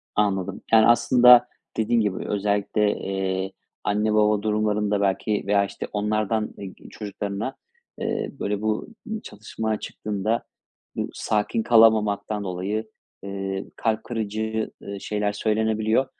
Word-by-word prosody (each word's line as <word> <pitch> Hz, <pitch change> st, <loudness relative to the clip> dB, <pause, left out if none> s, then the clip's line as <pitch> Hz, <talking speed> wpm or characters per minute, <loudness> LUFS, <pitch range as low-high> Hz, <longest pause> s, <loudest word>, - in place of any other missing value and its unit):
Anladım. 100 Hz, -2 st, 0 dB
Yani, 110 Hz, 0 st, +7 dB
aslında 120 Hz, +1 st, +7 dB, 0.3 s
dediğin 115 Hz, +1 st, +2 dB
gibi 100 Hz, -3 st, -2 dB
özellikle, 105 Hz, +1 st, +1 dB
eee, 95 Hz, 0 st, -2 dB, 0.3 s
anne 105 Hz, +1 st, +1 dB
baba 105 Hz, -1 st, +3 dB
durumlarında 105 Hz, -1 st, +1 dB
belki 100 Hz, +2 st, 0 dB
veya, 100 Hz, 0 st, +3 dB
işte, -, -, -6 dB
onlardan, 105 Hz, +1 st, 0 dB
eee, 95 Hz, -2 st, -7 dB, 0.2 s
çocuklarına, 105 Hz, +3 st, -4 dB, 0.4 s
eee, -, -, -2 dB
böyle, 100 Hz, 0 st, -1 dB
bu 110 Hz, 0 st, -1 dB, 0.4 s
çatışma 110 Hz, +1 st, -4 dB
çıktığında 105 Hz, +2 st, -2 dB, 0.5 s
bu -, -, -2 dB
sakin 110 Hz, +1 st, 0 dB
kalamamaktan 110 Hz, -2 st, +4 dB
dolayı, 95 Hz, +4 st, -2 dB, 0.4 s
eee, 95 Hz, 0 st, -4 dB
kalp 110 Hz, -1 st, 0 dB
kırıcı, 110 Hz, -1 st, -2 dB
ııı, 100 Hz, -1 st, -6 dB
şeyler 105 Hz, 0 st, -1 dB
söylenebiliyor. 110 Hz, +3 st, +1 dB
105 Hz, 115 wpm, -24 LUFS, 100-110 Hz, 0.5 s, Yani